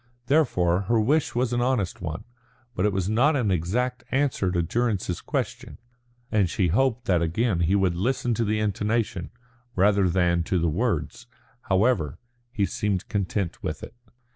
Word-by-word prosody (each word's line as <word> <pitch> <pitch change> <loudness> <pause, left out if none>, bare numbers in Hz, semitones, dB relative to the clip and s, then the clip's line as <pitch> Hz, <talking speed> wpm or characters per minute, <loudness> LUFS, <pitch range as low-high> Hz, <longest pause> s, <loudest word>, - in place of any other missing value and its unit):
Therefore 100 - +2
her 115 -1 +4
wish 140 +7 +1
was 125 0 0
an 120 - +1
honest 120 -9 0
one. 80 -2 -5 0.5
But 100 0 +1
it - - +1
was 95 -2 -1
not 125 +9 +3
an 115 -7 +1
exact 120 +9 -1
answer 135 -8 +1
to 90 -1 0
Durrance's 100 -2 -1
question, - - -4 0.5
and 100 -5 +2
she 90 0 +1
hoped 125 +5 +1
that 90 -6 +2
again 90 +4 0
he 85 +3 +2
would 95 -3 +2
listen 120 +5 0
to 115 - 0
the 110 0 0
intonation, 105 -2 -1 0.5
rather 100 0 +3
than 85 -1 +2
to 95 - 0
the 85 -1 +1
words. 120 +6 -2 0.4
However, 95 - +2 0.3
he 105 -5 0
seemed 100 -1 -2
content 100 -2 -2
with 75 0 -4
it. - - -9
105 Hz, 165 wpm, -25 LUFS, 90-120 Hz, 0.5 s, her